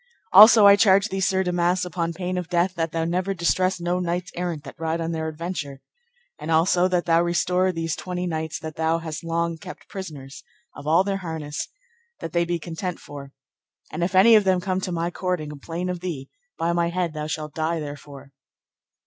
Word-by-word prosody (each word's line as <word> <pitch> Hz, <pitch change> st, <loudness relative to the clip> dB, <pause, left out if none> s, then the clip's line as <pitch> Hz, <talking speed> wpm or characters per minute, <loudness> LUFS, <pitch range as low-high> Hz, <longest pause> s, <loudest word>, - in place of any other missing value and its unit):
Also 215 Hz, +2 st, +9 dB
I 200 Hz, 0 st, +9 dB
charge 200 Hz, 0 st, +4 dB
thee, 195 Hz, -, -3 dB
Sir 190 Hz, 0 st, +1 dB
Damas, 180 Hz, 0 st, +1 dB
upon 170 Hz, -1 st, -2 dB
pain 180 Hz, +2 st, -4 dB
of 180 Hz, -2 st, -4 dB
death, 180 Hz, +1 st, +1 dB
that 165 Hz, -3 st, -2 dB
thou 165 Hz, 0 st, -1 dB
never 185 Hz, +3 st, -1 dB
distress 185 Hz, +3 st, +1 dB
no 175 Hz, +1 st, -1 dB
knights 180 Hz, 0 st, -2 dB
errant 175 Hz, -4 st, -3 dB
that 140 Hz, -, -11 dB
ride 165 Hz, 0 st, -1 dB
on 165 Hz, 0 st, -2 dB
their 160 Hz, -1 st, -3 dB
adventure. 155 Hz, -3 st, -5 dB, 0.6 s
And 150 Hz, -, -6 dB
also 175 Hz, +3 st, +3 dB
that 180 Hz, -2 st, 0 dB
thou 165 Hz, 0 st, +4 dB
restore 180 Hz, +2 st, +1 dB
these 165 Hz, -2 st, -3 dB
twenty 180 Hz, -1 st, -4 dB
knights 160 Hz, -2 st, -3 dB
that 155 Hz, -1 st, -7 dB
thou 160 Hz, +1 st, +1 dB
hast 160 Hz, -1 st, -6 dB
long 165 Hz, 0 st, -2 dB
kept 180 Hz, -, -10 dB
prisoners, 145 Hz, -8 st, -8 dB, 0.3 s
of 145 Hz, -, -9 dB
all 165 Hz, +4 st, +4 dB
their 195 Hz, 0 st, -1 dB
harness, 160 Hz, -5 st, -5 dB, 0.5 s
that 165 Hz, -, -7 dB
they 170 Hz, 0 st, +2 dB
be 175 Hz, 0 st, -1 dB
content 170 Hz, +2 st, -5 dB
for; 140 Hz, -1 st, -10 dB, 0.6 s
and 170 Hz, -, -3 dB
if 185 Hz, +2 st, -1 dB
any 210 Hz, +5 st, +7 dB
of 215 Hz, -2 st, +7 dB
them 190 Hz, -2 st, +2 dB
come 185 Hz, +1 st, -2 dB
to 185 Hz, -, -3 dB
my 170 Hz, 0 st, -2 dB
court 180 Hz, -1 st, -2 dB
and 150 Hz, -1 st, -6 dB
complain 165 Hz, +5 st, -5 dB
of 180 Hz, -1 st, -3 dB
thee, 165 Hz, -7 st, -6 dB, 0.3 s
by 170 Hz, +1 st, 0 dB
my 170 Hz, 0 st, +1 dB
head 175 Hz, -2 st, -2 dB
thou 150 Hz, -1 st, -4 dB
shalt 155 Hz, -1 st, -4 dB
die 160 Hz, +1 st, -1 dB
therefore. 145 Hz, -2 st, -9 dB
170 Hz, 205 wpm, -24 LUFS, 160-180 Hz, 0.6 s, Also